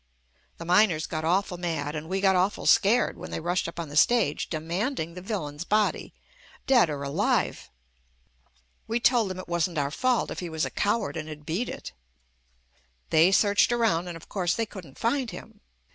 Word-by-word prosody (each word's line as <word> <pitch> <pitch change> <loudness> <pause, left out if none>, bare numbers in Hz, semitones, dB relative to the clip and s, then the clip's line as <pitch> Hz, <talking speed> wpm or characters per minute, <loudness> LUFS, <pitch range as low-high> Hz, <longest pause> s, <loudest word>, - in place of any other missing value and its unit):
The 170 - -8
miners 180 -2 +3
got 155 - -4
awful 180 +1 0
mad 160 -4 -3
and 155 +1 -6
we 190 +1 -1
got 190 -1 +4
awful 185 +3 0
scared, 225 +3 +3
when - - -7
they - - -4
rushed 175 +2 -1
up 170 - -7
on 165 -3 -4
the 145 - -9
stage 215 -2 +3
demanding 170 - -3
the 180 - -8
villain's 170 -7 -4
body, 210 +3 0 0.5
dead 245 - +4
or 145 -2 -4
alive. 140 0 0 1.2
We 230 +2 0
told 235 -4 +3
them 185 - -5
it 185 - -8
wasn't 170 0 -1
our 140 -1 0
fault 255 - 0
if - - -5
he 175 - -5
was 160 -1 -1
a - - -5
coward 200 -8 -1
and 155 0 -5
had 150 -1 -9
beat 185 +11 -2
it. - - -7 1.2
They 165 +4 +5
searched 205 +3 +4
around 220 -8 +1
and, 175 -1 -6
of 165 - -15
course, 175 -3 -1
they 230 - -1
couldn't 180 -10 -12
find 250 +1 0
him. 210 +3 -11
180 Hz, 190 wpm, -26 LUFS, 160-215 Hz, 1.2 s, They